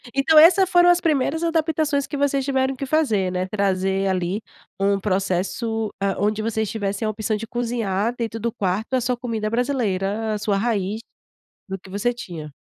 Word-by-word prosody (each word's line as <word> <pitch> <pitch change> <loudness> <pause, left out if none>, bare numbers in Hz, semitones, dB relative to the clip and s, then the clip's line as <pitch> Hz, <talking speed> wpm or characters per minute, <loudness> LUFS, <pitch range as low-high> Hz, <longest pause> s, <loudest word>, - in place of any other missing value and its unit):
Então 305 +3 +5
essa 370 +4 +7
foram 355 -1 +5
as 350 - +5
primeiras 320 0 0
adaptações 315 -3 0
que 290 - -4
vocês 275 -1 +1
tiveram 265 -1 0
que 275 - -4
fazer, 225 -11 +1
né, 185 0 -2
trazer 195 -1 0
ali 185 +2 -1 0.4
um 200 0 +2
processo, 195 +3 -1
ah, 195 -1 +1
onde 210 +1 0
vocês 220 -1 -1
tivessem 205 -1 -2
a 215 - +1
opção 215 0 -2
de 225 - -6
cozinhar 230 -2 -1
dentro 225 -1 -3
do 235 +1 -1
quarto 205 +3 -2
a 255 - +1
sua 250 +1 0
comida 230 -3 -3
brasileira, 220 -4 -1
a 210 - -1
sua 205 -1 0
raiz, 210 -2 -1 0.7
do 195 -1 -4
que 190 - -15
você 205 +6 0
tinha. 165 -10 -8
220 Hz, 180 wpm, -22 LUFS, 195-265 Hz, 0.7 s, essa